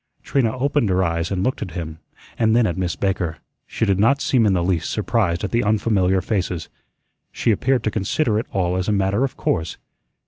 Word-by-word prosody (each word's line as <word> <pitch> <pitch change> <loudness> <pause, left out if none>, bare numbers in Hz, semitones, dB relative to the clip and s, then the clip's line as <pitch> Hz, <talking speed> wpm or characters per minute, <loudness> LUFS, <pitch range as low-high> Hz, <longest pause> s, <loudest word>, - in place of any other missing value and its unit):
Trina 130 -3 0
opened 140 -3 +1
her 95 0 +2
eyes 85 -1 -1
and 95 -2 -1
looked 130 - -1
at 100 - -3
him, 80 -2 -6 0.4
and 110 -1 +2
then 120 -1 +4
at 85 - -1
Miss 90 -2 -2
Baker. 90 -5 -1 0.3
She - - -1
did 100 -2 +1
not 135 +7 +4
seem 120 -6 +2
in 100 - +3
the 90 -2 +1
least 85 -3 0
surprised 105 -5 0
at 100 - -2
the 120 - +1
unfamiliar 100 -3 +2
faces. 90 -5 -2 0.6
She 115 - +1
appeared 125 +5 +1
to 110 - 0
consider 110 +3 0
it 115 - -5
all 90 -1 0
as 95 - -2
a - - +2
matter 100 +4 +1
of 135 - -3
course. 80 0 -1
100 Hz, 210 wpm, -21 LUFS, 90-115 Hz, 0.6 s, then